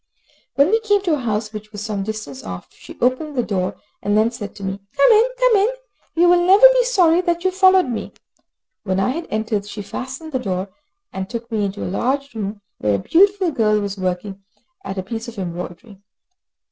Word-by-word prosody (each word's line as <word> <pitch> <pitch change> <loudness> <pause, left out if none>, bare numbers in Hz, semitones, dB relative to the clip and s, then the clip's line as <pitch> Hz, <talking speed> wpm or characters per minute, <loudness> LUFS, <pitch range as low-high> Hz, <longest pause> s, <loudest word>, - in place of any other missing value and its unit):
When 280 +6 +4
we 450 - +4
came 410 -3 +1
to 355 - 0
her - - -4
house, 215 -2 -2
which 215 0 -8
was 205 -2 -7
some 210 -2 -3
distance 200 -10 -6
off, 90 -1 -8
she - - -13
opened 255 +4 0
the 245 - +1
door 185 -4 -2 0.3
and 205 +1 +1
then 220 +2 +3
said 210 -4 -7
to 200 - -10
me, 190 +1 -3 0.2
"Come 280 +7 +6
in, 450 +3 +5
come - - +4
in; 400 +3 +3 0.5
you 345 +1 +4
will 350 0 +5
never 390 +6 +7
be - - +3
sorry 360 -8 +4
that 345 -1 -1
you 375 - +2
followed 375 0 +5
me." 240 -3 -4 0.7
When 190 -2 -1
I 195 - +1
had 325 +6 -3
entered 215 -1 -2
she 205 0 -7
fastened 270 +9 -7
the 260 - -1
door, 190 -4 -3 0.4
and 190 0 -4
took 235 0 -6
me 215 -2 0
into 200 +1 -4
a - - -3
large 275 +9 -1
room, 205 -1 -5 0.2
where 105 -1 +1
a - - +1
beautiful 380 - +3
girl 215 -5 +2
was 200 -1 -3
working 190 +1 -3 0.4
at 195 0 -6
a 190 - -2
piece 225 +4 -6
of 235 -2 -9
embroidery. 180 +3 -7
225 Hz, 210 wpm, -20 LUFS, -, 0.7 s, never